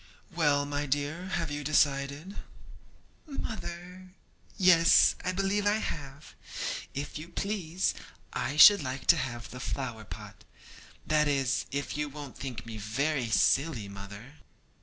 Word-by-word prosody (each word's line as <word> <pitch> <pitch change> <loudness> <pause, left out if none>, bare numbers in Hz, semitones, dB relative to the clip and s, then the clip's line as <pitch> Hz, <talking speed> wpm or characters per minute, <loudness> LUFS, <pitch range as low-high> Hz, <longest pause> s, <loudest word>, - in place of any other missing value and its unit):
'Well, 145 -4 +2
my 145 0 -2
dear, 145 +6 -2
have 170 -5 -2
you 145 0 -4
decided?' 145 +4 +1 0.9
'Mother! 185 - -7 0.4
yes, 180 -4 +6
I 185 - 0
believe 195 +2 0
I 205 - +4
have. 145 -7 -6 0.6
If 145 +2 -4
you 160 +2 -9
please, 185 -2 -1 0.4
I 140 +3 -2
should 200 +4 +10
like 130 -1 -5
to - - -3
have 120 -4 -4
the 125 - -8
flower 125 -4 -4
pot; - - -10 0.6
that 150 -1 +2
is, 135 -3 0
if 140 0 -3
you 150 0 -2
won't 145 -2 -9
think 125 -4 -6
me 115 -1 -7
very 130 +4 -1
silly, 130 -1 +2
mother.' 100 +8 -10
145 Hz, 135 wpm, -29 LUFS, 135-170 Hz, 0.9 s, should